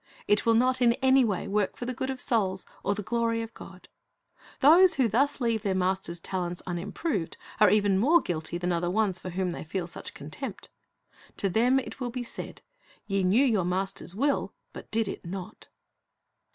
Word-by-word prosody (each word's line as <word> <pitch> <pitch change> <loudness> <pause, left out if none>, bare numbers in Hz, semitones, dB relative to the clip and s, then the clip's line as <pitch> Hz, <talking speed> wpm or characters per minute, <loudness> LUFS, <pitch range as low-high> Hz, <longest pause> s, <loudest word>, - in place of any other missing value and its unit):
It 205 +2 +2
will 230 - +5
not 255 +2 +2
in 235 -1 +5
any 265 +1 +4
way 210 -4 -1
work 200 0 0
for 245 - -5
the 255 - -3
good 260 +2 -3
of 265 -1 -4
souls 195 -7 0 0.2
or 200 - 0
the 210 - -5
glory 230 +1 0
of 225 - -9
God. 185 -1 -12 0.7
Those 340 +6 +7
who 260 -3 +3
thus 270 +8 +1
leave 230 -3 0
their 195 -3 -1
Master's 185 -2 -1
talents 175 -1 -4
unimproved, 185 - -3 0.2
are 210 - +7
even 200 -1 +3
more 310 +11 +5
guilty 165 - -3
than 180 +1 -1
are 170 - 0
the 175 - -1
ones 195 -2 +1
for 185 - -6
whom 180 0 -2
they - - -6
feel 175 +3 -3
such 170 - -9
contempt. 190 - -7 0.7
To 195 - 0
them 240 +7 +3
it 265 - -8
will 250 -2 -2
be 245 +1 -4
said, 235 - -7 0.4
Ve 195 -1 0
knew 210 +10 +4
your 215 -8 +2
Master's 185 0 -2
will, 280 +5 0 0.2
but - - -10
did 225 -1 0
it - - -6
not. 185 +1 -8
205 Hz, 195 wpm, -28 LUFS, 185-245 Hz, 0.7 s, Those